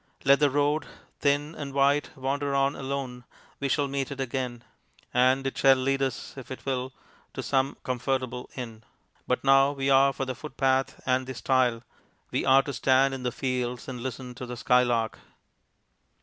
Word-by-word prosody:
Let 140 +1 +6
the 145 -1 +4
road, 145 +2 +1 0.3
thin 145 +2 +1
and 140 -3 -7
white, 140 +1 +3
wander 140 +1 -1
on 135 +1 +2
alone; 130 -2 -4 0.4
we 140 - -1
shall 145 +1 +1
meet 135 -1 -2
it 140 - -7
again, 125 -2 -3 0.5
and 130 +2 +3
it 135 - -2
shall 135 -1 +6
lead 135 +1 0
us 130 -3 -3
if 130 - -9
it 130 - -8
will 130 -1 -2 0.4
to - - -4
some 135 0 0
comfortable 130 0 -2
inn; 115 -4 -7 0.4
but 125 - 0
now 135 +1 +5
we 135 -1 0
are 135 +1 +6
for 135 0 -3
the 130 - -3
footpath 135 -1 -1
and 130 0 +1
the 130 - -5
stile 125 -2 +1 0.5
we - - 0
are 135 +1 +6
to 140 - -5
stand 135 +2 +3
in 135 - -5
the 125 -1 -1
fields 125 -1 -3
and 125 -3 -6
listen 125 0 -5
to 125 0 -8
the 125 0 -6
skylark. 120 -2 +2
135 Hz, 175 wpm, -27 LUFS, 125-140 Hz, 0.5 s, Let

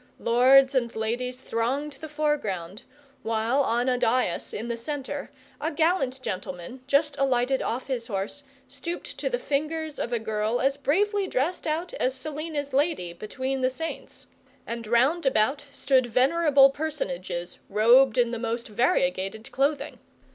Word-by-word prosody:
Lords 260 +3 +5
and 240 -3 0
ladies 245 +3 -2
thronged 265 +6 -2
the 310 +3 -9
foreground, 220 - -2 0.4
while 225 +4 +1
on 240 -1 +1
a 250 -1 +2
dais 230 -7 +1
in 225 +3 -5
the 235 - -2
centre 285 +3 -5 0.3
a 310 - 0
gallant 300 -4 +1
gentleman, 185 +4 -5
just 285 +2 +2
alighted 265 -1 +2
off 240 +3 -2
his 250 -4 -3
horse, 205 +7 -4 0.2
stooped 310 +6 -6
to - - -1
the - - 0
fingers 310 - -2
of 235 - -3
a 240 - +1
girl 220 +1 -1
as 275 +1 +2
bravely 395 +8 +1
dressed 320 +5 -1
out 325 +3 -2
as 255 +1 0
Selina's 295 0 -5
lady 280 - 0
between 260 +8 -4
the 255 - +3
saints; 325 +5 -7 0.4
and 230 -1 -5
round 270 +8 +3
about 270 +4 +1
stood 260 -2 +2
venerable 275 +3 +5
personages, 185 - -4
robed 235 +5 +5
in 240 -1 +3
the 235 - -3
most 230 +2 -3
variegated 205 -1 0
clothing. 280 +2 -1
260 Hz, 145 wpm, -26 LUFS, 230-290 Hz, 0.4 s, Lords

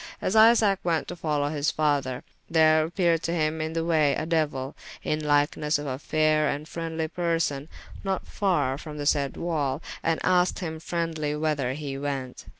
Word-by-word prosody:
As 185 - -1
Isaac 220 -3 +6
went 165 -2 0
to 175 - -5
follow 150 -4 -1
his 150 0 0
father, 140 -4 0 0.3
there 155 -1 +5
appeared 170 -1 +1
to 165 - -2
him 155 -1 0
in 160 +1 -3
the 165 0 -1
way 155 -4 +3
a 155 - -2
Deuyl, 150 -5 -1 0.3
in 155 - 0
lykenesse 150 +1 +2
of 145 - -6
a 130 -1 -3
fayre 155 0 +2
and 145 +2 -3
freendly 165 -1 -3
person, 165 -4 -1 0.3
not 195 -1 -2
farre 150 -10 0
from 150 -1 -8
the 145 - -4
sayde 140 -2 +1
wall, 150 -5 -1 0.2
and 165 -1 0
asked 180 0 +3
hym 160 -4 -4
freendlye 160 -3 -2
whyther 145 -5 0
he 140 -1 -5
went. 135 -3 -4
155 Hz, 175 wpm, -26 LUFS, 145-165 Hz, 0.3 s, Isaac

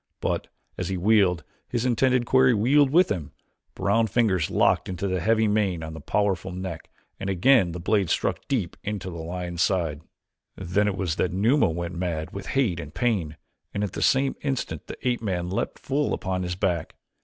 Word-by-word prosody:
But - - -2 0.3
as - - -2
he 95 - -1
wheeled, 95 -4 +3 0.3
his 120 0 -1
intended 125 0 +2
quarry 130 -1 +4
wheeled 135 +7 +4
with 175 +6 +4
him, 85 -7 -3 0.4
brown 100 +4 +2
fingers 100 -7 +1
locked - - +2
in 90 - -3
the 95 0 -1
heavy 110 +4 +2
mane 100 -6 0
on 80 0 -6
the 80 - -8
powerful 95 +2 0
neck 90 -2 -6 0.3
and 95 - -3
again 95 0 +4
the 90 - -6
blade 95 +1 +1
struck - - 0
deep 110 -11 -1
into 100 -3 -4
the 85 - -7
lion's 85 +1 -4
side. 85 -6 0 0.5
Then 95 +3 0
it 100 -2 -1
was 90 -5 -1
that 90 - +1
Numa 110 - +3
went 85 +2 -4
mad 85 -3 -3
with 95 0 -7
hate 105 -11 +2
and 75 - -7
pain 95 -11 0 0.4
and 100 - 0
at 105 - -2
the - - -5
same 135 0 +3
instant 135 -3 -3
the - - -7
ape 120 -2 0
man 90 -4 -2
leaped 95 - -2
full 140 +2 -1
upon 95 -1 -3
his 90 -1 -3
back. 90 -4 -1
95 Hz, 190 wpm, -25 LUFS, 85-115 Hz, 0.5 s, quarry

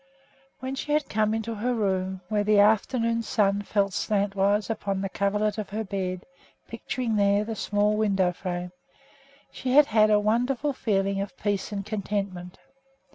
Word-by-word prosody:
When 260 +1 -4
she 295 +2 -3
had 300 -1 +1
come 215 0 +1
into 225 +1 -3
her 240 +3 -1
room, 190 -3 -1
where 210 +1 0
the 210 0 +3
afternoon 230 +3 +3
sun 205 -2 +1
fell 200 -1 0
slantwise 200 +1 +1
upon 200 -3 -2
the 195 - -2
coverlet 210 +2 0
of 210 - -5
her 215 +2 -3
bed, 185 -3 -4 0.4
picturing 235 -4 -3
there 200 0 +3
the 225 0 -4
small 210 0 +1
window 195 -4 +2
frame, 180 -1 -5 0.8
she 255 -1 -3
had 295 +1 +8
had 215 -4 +4
a 210 -1 +5
wonderful 245 +7 0
feeling 195 -5 0
of 195 -2 -6
peace 205 -1 -2
and 200 -2 -4
contentment. 200 -4 -4
205 Hz, 160 wpm, -26 LUFS, 195-220 Hz, 0.8 s, had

